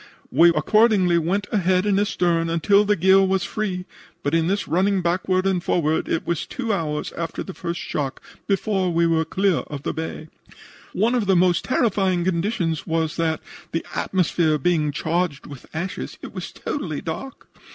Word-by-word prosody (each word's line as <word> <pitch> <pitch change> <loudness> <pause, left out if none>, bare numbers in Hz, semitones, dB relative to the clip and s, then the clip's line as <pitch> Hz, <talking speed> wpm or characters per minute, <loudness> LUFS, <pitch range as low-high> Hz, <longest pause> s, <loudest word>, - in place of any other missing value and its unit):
We 170 +1 +6
accordingly 185 +1 +3
went 190 +5 -1
ahead 185 -1 +2
and 200 -1 +2
astern 175 -4 +1
until 200 +5 +3
the 210 0 +3
gear 190 +2 +5
was 190 -1 +1
free, 190 -3 -3 0.4
but 145 - -1
in 165 0 +2
this 200 +2 -1
running 190 +2 +2
backward 185 +2 +1
and 185 -3 +1
forward 160 -2 0
it 165 - -1
was 170 -3 -2
two 235 -5 -2
hours 150 -5 -2
after 165 -1 -4
the 190 - -8
first 170 -1 -4
shock 140 -2 -3 0.3
before 195 -2 0
we 170 0 +2
were 165 -1 +2
clear 190 +1 +1
of 145 -2 -7
the - - -2
bay. 160 -1 -6 0.6
"One 225 +6 +2
of 235 -5 0
the 190 - +4
most 175 -2 +3
terrifying 195 -8 +1
conditions 175 -2 -1
was 160 -1 0
that, 160 -2 0 0.3
the 165 - -2
atmosphere 170 -4 +1
being 155 0 +1
charged 165 0 -1
with 140 -3 -11
ashes, 170 +4 -5
it - - -8
was - - -6
totally 165 - -4
dark. 220 +12 -6
175 Hz, 170 wpm, -23 LUFS, 165-195 Hz, 0.6 s, We